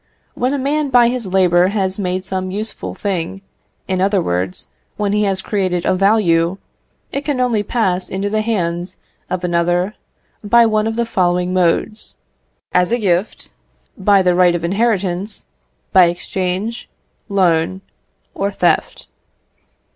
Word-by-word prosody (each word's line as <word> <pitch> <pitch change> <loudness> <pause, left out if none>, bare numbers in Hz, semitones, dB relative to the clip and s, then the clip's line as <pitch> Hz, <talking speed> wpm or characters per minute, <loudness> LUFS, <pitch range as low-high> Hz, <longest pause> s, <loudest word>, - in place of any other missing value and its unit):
When 250 +2 -1
a 285 - 0
man 285 +2 0
by 245 -2 +5
his 245 -4 -2
labour 180 -1 +3
has 190 -1 -1
made 185 -1 -2
some 185 0 -3
useful 210 +4 -5
thing 195 -1 -3 0.4
in 185 -1 -1
other 195 +1 +2
words, 90 - -2 0.3
when 205 -1 0
he 210 0 +2
has 190 -1 -1
created 185 -4 -1
a - - +3
value 185 -3 +2 0.5
it 280 - -3
can 290 -4 -2
only 240 -4 +1
pass 190 -4 -1
into 195 +2 -2
the 215 +1 0
hands 175 -5 -2 0.3
of 180 -1 -3
another 175 +2 +1 0.5
by 235 +3 +5
one 215 -1 +1
of 225 - -2
the 235 0 0
following 180 -3 0
modes 185 +4 0 0.6
as 180 +2 +2
a 240 - +2
gift, 185 - -1 0.4
by 195 0 +3
the 180 -1 +3
right 175 -1 +4
of 170 - -3
inheritance, 195 0 -1 0.5
by 185 - +7
exchange, 185 +5 -3 0.4
loan, 185 -1 +1 0.5
or 200 +1 -2
theft. 175 -4 0
190 Hz, 145 wpm, -18 LUFS, 180-215 Hz, 0.6 s, by